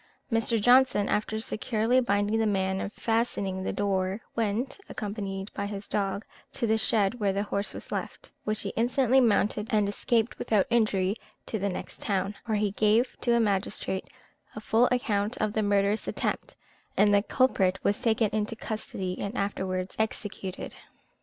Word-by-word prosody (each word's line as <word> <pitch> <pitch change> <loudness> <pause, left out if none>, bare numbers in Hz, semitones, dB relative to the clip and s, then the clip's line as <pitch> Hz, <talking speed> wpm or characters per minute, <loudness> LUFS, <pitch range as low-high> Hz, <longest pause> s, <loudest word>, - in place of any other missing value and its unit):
Mr. 225 0 +3
Johnson, 245 -2 +5
after 220 +1 0
securely 225 +2 +1
binding 205 -1 +1
the 220 - +2
man 190 -1 0
and 200 - -4
fastening 215 -5 -1
the 190 - -2
door, 195 -1 0 0.2
went 230 - -1
(accompanied 200 -2 -5
by 200 - -3
his 200 0 -6
dog) 200 0 -1 0.3
to - - -1
the 220 -1 +3
shed 220 +1 +1
where 200 -2 +2
his 200 +2 -1
horse 200 0 -1
was - - -9
left, - - -5
which 215 0 -2
he 200 - -2
instantly 250 +4 +3
mounted, 210 -2 +2
and 210 -2 +2
escaped 225 +3 0
without 210 -3 +2
injury 205 -4 +2 0.3
to 220 - -3
the 200 +1 0
next 180 - -7
town, 195 0 -1
where 220 -2 +1
he 205 -1 +1
gave 220 +5 +2
to 240 -1 +3
a - - +4
magistrate 200 -2 -1 0.5
a - - -4
full 225 +3 +3
account 220 -3 0
of 215 -1 0
the 220 - +1
murderous 205 +1 +1
attempt, - - -2 0.4
and 205 0 +5
the 200 - +5
culprit 195 -6 +2
was 200 - +1
taken 225 -1 +3
into 215 +1 -1
custody 195 -5 -4
and 205 +4 -4
afterwards 190 -2 -2
executed. 205 -3 -3
210 Hz, 165 wpm, -28 LUFS, 200-225 Hz, 0.5 s, Johnson